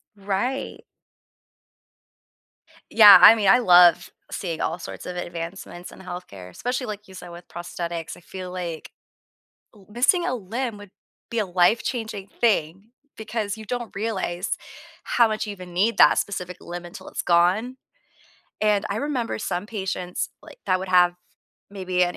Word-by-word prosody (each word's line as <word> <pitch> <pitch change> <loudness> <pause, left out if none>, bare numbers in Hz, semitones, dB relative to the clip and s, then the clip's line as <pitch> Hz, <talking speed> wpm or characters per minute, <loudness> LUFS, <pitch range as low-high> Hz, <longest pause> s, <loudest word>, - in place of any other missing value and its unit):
Right. 205 +7 -3 2.1
Yeah, 210 -4 +10
I 220 +5 +10
mean, 210 -3 0
I 245 - +7
love 180 -6 +6 0.2
seeing 170 -4 -4
all 170 +2 -2
sorts - - -9
of 180 - -6
advancements 175 +1 -7
in - - -14
health 180 -1 -8
care, 90 -2 -11
especially, 250 - -4
like 210 0 -7
you 190 - -14
said, 180 -1 -10
with 170 0 -12
prosthetics, 170 -1 -6
I - - -16
feel 185 +1 -8
like, 175 -3 -6 0.8
l 195 -2 -19
missing 255 - +2
a 250 - -1
limb 230 +2 -4
would 205 -2 -13 0.4
be 235 - -2
a 210 - 0
life-changing 200 +3 0
thing 200 -1 0 0.3
because 215 -1 -4
you 220 - -10
don't 240 0 -5
realize 195 -3 -2 0.5
how 235 - +3
much 215 0 -2
you - - -4
even 180 -3 -11
need 210 +6 +1
that - - +6
specific 180 -3 -4
limb 175 0 -8
until 175 - -11
it's - - -4
gone, 185 +9 +2 0.8
and 210 -1 +2
I 200 - -2
remember 265 -3 -2
some 185 -2 -3
patients, 190 -4 -4
like, - - -14
that 185 - +1
would 190 - -6
have 180 -1 +5 0.6
maybe 185 -2 -1
an 175 0 0
190 Hz, 155 wpm, -23 LUFS, 175-220 Hz, 2.1 s, Yeah